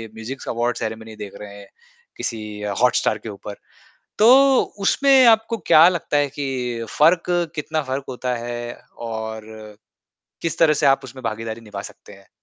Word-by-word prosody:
Musics 120 +4 -8
award 120 +1 -1
ceremony 110 0 -6
देख 105 -2 -8
रहे 100 -1 -9
हैं - - -13 0.5
किसी 115 -2 -4 0.4
हॉटस्टार 125 -3 +2
के - - -4
ऊपर। 100 0 -8 0.6
तो 215 - +6 0.6
उसमें 275 +4 +3
आपको 225 0 +4
क्या 160 +2 +8
लगता 170 -4 -1
है 145 0 +2
कि 140 - -2 0.5
फ़र्क 165 +3 +5 0.3
कितना 155 +1 -2
फ़र्क 135 +1 -3
होता 125 0 -3
है 120 0 -5 0.5
और 110 -1 -5 1.0
किस 165 - -2
तरह 160 -2 +5
से - - +5
आप 135 0 +4
उसमें 130 0 -11
भागीदारी 115 0 -4
निभा 105 -3 -8
सकते 105 - -16
हैं? 100 0 -18
120 Hz, 155 wpm, -21 LUFS, 110-150 Hz, 1.0 s, क्या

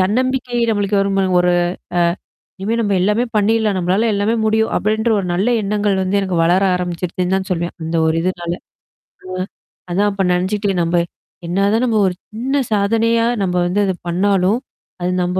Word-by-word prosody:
தன்னம்பிக்கை 250 +5 0
நம்மளுக்கு 205 -1 +1
வரும் 195 0 0
பாருங்க 185 -2 +2
ஒரு 180 0 +3 0.5
அ. - - +3 0.6
இனிமே 210 +4 -1
நம்ப 205 -3 +1
எல்லாமே 210 +5 +2
பண்ணீரலாம், 215 0 +2
நம்மளால 185 +6 +1
எல்லாமே 205 +3 +1
முடியும் 220 +1 +1
அப்படின்ற 220 +2 0
ஒரு 195 - -2
நல்ல 195 +6 +1
எண்ணங்கள் 205 0 0
வந்து 190 +1 0
எனக்கு 190 -2 -2
வளர 180 +3 +3
ஆரம்பிச்சுருச்சுன்னு 180 +1 -2
தான் 190 0 -3
சொல்வேன். 175 -1 -1
அந்த 165 +1 -2
ஒரு 160 - +2
இதுனால. 175 -1 -2 0.7
ஆ. 185 - -7 0.6
அதான் 200 +4 +2
அப்ப 195 0 -3
நெனச்சுட்டேன், 190 +1 0
நம்ப 170 +1 +1 0.5
என்னா 185 +3 0
தான் 225 +2 +2
நம்ம 230 -3 +1
ஒரு 185 - -1 0.2
சின்ன 265 +6 0
சாதனையா 230 +3 +2 0.2
நம்ப 180 -2 0
வந்து 180 +4 0
அத 190 - 0
பண்ணாலும், 190 +4 +2 0.4
அது 180 +1 0
நம்ப 180 +1 -1
195 Hz, 170 wpm, -18 LUFS, 180-215 Hz, 0.7 s, ஒரு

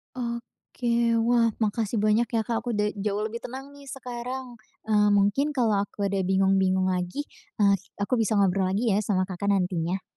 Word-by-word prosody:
Oke, 235 -1 -2
wah 235 -1 +4 0.2
makasih 220 +1 -1
banyak 215 +2 +2
ya, 225 0 0
Kak, 230 +1 -1
aku 240 -1 -3
udah 210 0 +1
jauh 205 +1 -1
lebih 220 +2 -4
tenang 265 +4 -8
nih 285 -1 -14
sekarang. 250 -1 -6 0.2
Eee, 210 -1 +3
mungkin 205 +9 +2
kalau 225 -6 +2
aku 205 - -6
ada 195 0 0
bingung-bingung 190 0 +2
lagi, 180 +10 -2 0.3
eee, 200 -2 +4 0.2
aku 220 +4 -1
bisa 220 -1 +1
ngobrol 195 -1 +2
lagi 210 +5 +1
ya 200 - +3
sama 200 -3 +1
Kakak 185 +1 -5
nantinya. 185 -2 0
210 Hz, 170 wpm, -26 LUFS, 195-235 Hz, 0.3 s, wah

